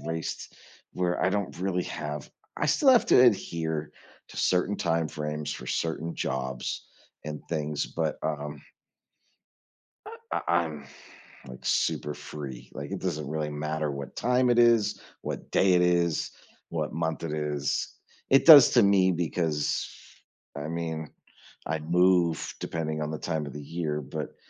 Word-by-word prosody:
raised, 80 +2 -5 0.4
where 90 -1 -1
I 95 - +3
don't 100 -1 -2
really 90 -1 0
have 75 -1 -5 0.3
I - - 0
still 165 - +3
have 250 -3 +5
to - - +6
adhere 80 -9 +1 0.4
to - - -13
certain 95 +3 +1
time 80 -1 0
frames 75 0 -4
for 60 - -8
certain 80 +3 -2
jobs 65 -1 -3 0.4
and 75 0 -5
things, 75 -2 -2
but, 80 -2 -2
um 75 -2 -4 1.4
uh, - - -7 0.2
I, - - +1 0.2
I'm, 75 -3 -6 0.6
like, 65 -1 -10
super 75 0 0
free. 75 -3 -8
Like 70 +1 -6
it - - -4
doesn't 75 -2 -3
really 75 0 -2
matter 75 +1 -2
what 70 -1 -7
time 125 +1 +2
it 120 - +3
is, 115 -3 +4 0.2
what - - -5
day 95 -1 +4
it 90 - +4
is, 85 -2 +2 0.4
what 80 -2 -3
month 80 0 -2
it 80 -3 -3
is. 75 -2 -2 0.4
It 135 - +6
does 150 -5 +11
to 120 - +5
me 95 -2 +4
because, 80 -3 -1 0.7
I 75 +1 -4
mean, 80 -2 -4 0.6
I 80 +1 -1
move 85 0 +2
depending 80 -1 -3
on 75 - -2
the 80 - -3
time 80 -1 -2
of 70 - -8
the 75 - -7
year, 75 0 -3
but 65 - -6
80 Hz, 150 wpm, -27 LUFS, 75-90 Hz, 1.4 s, does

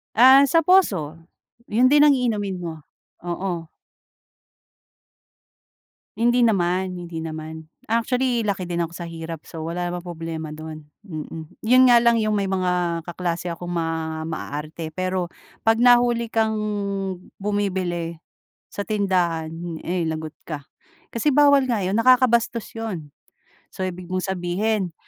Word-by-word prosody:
Ah, 265 +4 +8
sa 330 +4 +4
poso, 190 - +3 0.5
yun 245 +4 +4
din 295 0 +7
ang 290 - +6
iinomin 210 -6 -1
mo, 165 -2 -4 0.5
oo. 175 -1 -3 2.5
Hindi 240 +1 +3
naman, 185 -2 +1
hindi 170 -2 -6
naman. 160 0 -7 0.2
Actually 240 +1 +1
laki 195 -2 -1
din 175 - -2
ako 165 - -5
sa 170 -1 -6
hirap. 165 -1 -7
So, 160 -1 -8
wala 175 +1 -2
namang 175 0 -5
problema 165 -2 -5
do'n, 155 -1 -9 0.2
mm. 160 -3 -8
'Yon 255 +3 +6
nga 240 - +8
lang 235 0 +5
'yong 215 -1 +1
may 200 -1 0
mga 180 -3 0
kaklase 175 0 -3
akong 175 +1 -6
ma 160 -1 -2
maarte 160 0 -5
pero 185 -1 -1 0.4
'pag 225 0 +4
nahuli 240 -1 +4
kang 220 -1 +1 0.8
bumibili 185 -5 -2 0.5
sa 205 - -4
tindahan, 180 -6 0 0.3
eh, 175 0 -1
lagot 155 -1 -4
ka, 150 -3 -5 0.5
kasi 285 +6 +1
bawal 285 0 +6
nga 235 -4 +1
'yon 190 +3 0
nakakabastos 235 -2 +3
'yon. 185 -10 -5 0.6
So, 190 - -5
ibig 180 -1 -5
mong 185 0 -1
sabihin, 190 0 -1
185 Hz, 130 wpm, -23 LUFS, 165-225 Hz, 2.5 s, Ah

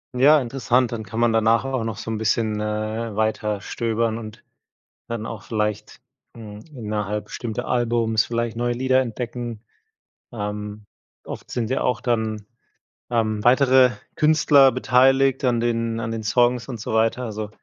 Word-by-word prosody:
Ja, 145 +4 +6
interessant, 125 -1 0
dann 115 -2 -4
kann 110 +2 -6
man 120 -1 +3
danach 115 +2 +3
auch 130 -3 -2
noch 110 -2 -4
so 110 - -7
'n 110 - -2
bisschen, 110 0 0
äh, 110 +1 -3
weiterstöbern 110 +1 -1
und 110 -2 -9 0.6
dann 115 -1 -4
auch 110 -3 -7
vielleicht, 105 0 -3 0.3
hm, 105 -3 -10
innerhalb 105 -3 -3
bestimmter 110 -3 -5
Alben 115 -2 +1
vielleicht 115 -1 -2
neue 120 +1 0
Lieder 130 +2 +2
entdecken. 120 -1 -5 0.7
Ähm, 105 -1 -5 0.4
oft - - -8
sind 115 -2 -2
ja 130 - 0
auch 125 -2 0
dann, 110 -3 -1 0.7
ähm, 110 -3 0
weitere 130 0 +5 0.3
Künstler 150 -3 +5
beteiligt 135 +2 +3
an 120 -2 +2
den 115 -1 -1
an 115 0 -3
den 115 -1 -4
Songs 120 +2 +2
und 120 -5 -6
so 110 - -4
weiter. 115 +3 +1
Also, 110 -2 -5
115 Hz, 150 wpm, -22 LUFS, 110-125 Hz, 0.7 s, Ja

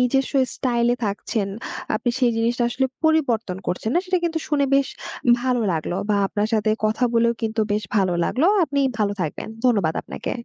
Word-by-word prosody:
নিজস্ব 265 +2 +1 0.2
স্টাইল 240 -2 +1
এ - - -9
থাকছেন। 205 0 -2 0.5
আপনি 240 +3 0
সেই 250 -2 +3
জিনিসটা 235 +2 +1
আসলে 265 +2 +1 0.2
পরিবর্তন 240 -12 +2
করছেন 180 +5 -2
না - - +4
সেটা 365 0 +1
কিন্তু 330 -1 0
শুনে 290 -2 +2
বেশ 275 -1 +3 0.5
ভালো 250 -1 +1
লাগলো। 160 +2 -2 0.2
বা 205 - +3
আপনার 205 +1 -1
সাথে 215 0 +2
কথা 220 +3 +1
বলেও 235 0 +4
কিন্তু 220 0 -1
বেশ 210 +1 0
ভালো 190 -3 +2
লাগলো। 295 +7 +1 0.2
আপনি 280 -2 -1 0.2
ভালো 205 -1 +1
থাকবেন। 160 +4 -3 0.2
ধন্যবাদ 200 -10 +3
আপনাকে। - - -6
235 Hz, 180 wpm, -22 LUFS, 210-260 Hz, 0.5 s, না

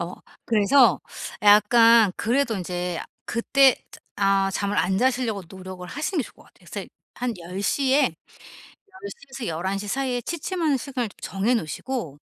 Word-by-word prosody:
어 170 +1 -4 0.3
그래서 225 - +4 0.4
약간 215 0 +6
그래도 240 -2 0
인제 180 -1 -3 0.2
그때 265 +3 +3 0.2
트 - - -14 0.2
아 195 -1 +2
잠을 200 +1 -1
안 190 +1 +1
자시려고 245 -4 0
노력을 185 0 -9
하시는 305 - -3
게 - - +2
좋을 - - -13
것 - - -20
같아요. - - -24
그래서 - - -5 0.3
한 245 -2 -2
10 180 +3 -7
시에, 275 +6 +2 0.7
10 400 -1 -12 0.2
시에서 250 - -5
11 190 +4 -2
시 205 +1 -5
사이에 250 +1 -2
취침하는 330 - -1
시간을 250 -5 -4
정해 200 +6 -1
놓으시고 225 - -3
225 Hz, 300 characters per minute, -24 LUFS, 195-265 Hz, 0.7 s, 약간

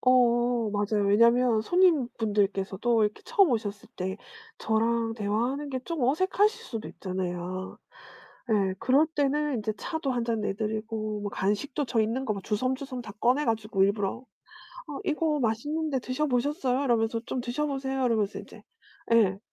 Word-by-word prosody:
어 240 -2 +3
맞아요. 205 0 0
왜냐면 235 +2 +4
손님분들께서도 225 - +2
이렇게 210 - -2
처음 410 - +4
오셨을 210 -3 -3
때 190 +1 -3 0.4
저랑 225 +1 +1
대화하는 240 +7 -1
게 260 - -3
좀 320 +2 -4
어색하실 380 - +2
수도 225 - -6
있잖아요. 185 0 -5 0.7
예. 195 -3 +2
그럴 265 +6 +4
때는 295 -2 0
인제 215 0 -2
차도 315 -5 -2
1 240 -1 -1
잔 230 -2 -1
내드리고 215 +1 -3
뭐 205 - -3
간식도 210 +10 -1
저 235 -2 +1
있는 230 +5 0
거 215 - 0
막 195 - -7
주섬주섬 255 +4 -2
다 215 -3 -9
꺼내 260 +5 +3
가지고 220 -4 0
일부러 200 +4 -1 0.6
"어 290 - -5
이거 305 -3 0
맛있는데 285 +6 -1
드셔 255 +5 -1
보셨어요?" 270 +1 0
이러면서 230 -2 +1
"좀 255 - -2
드셔 250 +5 -2
보세요." 270 -2 -2
이러면서 215 -4 0
인제 - - -14 0.5
예. 200 -4 +4
235 Hz, 330 characters per minute, -27 LUFS, 210-270 Hz, 0.7 s, 왜냐면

